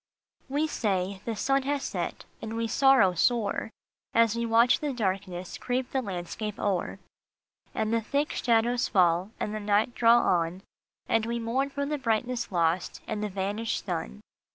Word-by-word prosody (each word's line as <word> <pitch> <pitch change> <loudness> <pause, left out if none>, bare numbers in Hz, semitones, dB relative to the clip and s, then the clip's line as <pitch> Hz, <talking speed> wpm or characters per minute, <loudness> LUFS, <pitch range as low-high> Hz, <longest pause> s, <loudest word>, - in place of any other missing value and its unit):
E 290 +3 +1
say, 195 -8 -1
" - - -28
The 230 - -2
sun 275 +5 +1
has 280 +1 -1
set," - - -4 0.2
and 225 0 -5
we 230 - 0
sorrow 265 -7 +5
sore 220 +4 +1 0.5
As 230 -1 +4
we 235 0 -1
watch 230 +2 +4
the 295 -2 -2
darkness 190 -5 -3
creep 250 0 -2
the 265 - 0
landscape 200 +1 -5
o 195 -3 +1
er, 190 - -7 0.8
And 220 +1 0
the 230 - +2
thick 285 +6 -1
shadows 240 +1 +2
fall, 180 -1 +3
and 210 - -2
the 215 - -3
night 210 +3 +1
draw 235 0 +5
on; 175 -3 +1 0.4
And 225 0 +1
we 235 0 -1
mourn 240 +4 -1
for 280 0 -3
the 295 0 -2
brightness 245 0 -1
lost, 170 0 0
and 215 -2 -3
the 210 - -1
vanished 200 +4 -2
sun. 65 +2 -4
225 Hz, 175 wpm, -28 LUFS, 195-245 Hz, 0.8 s, sorrow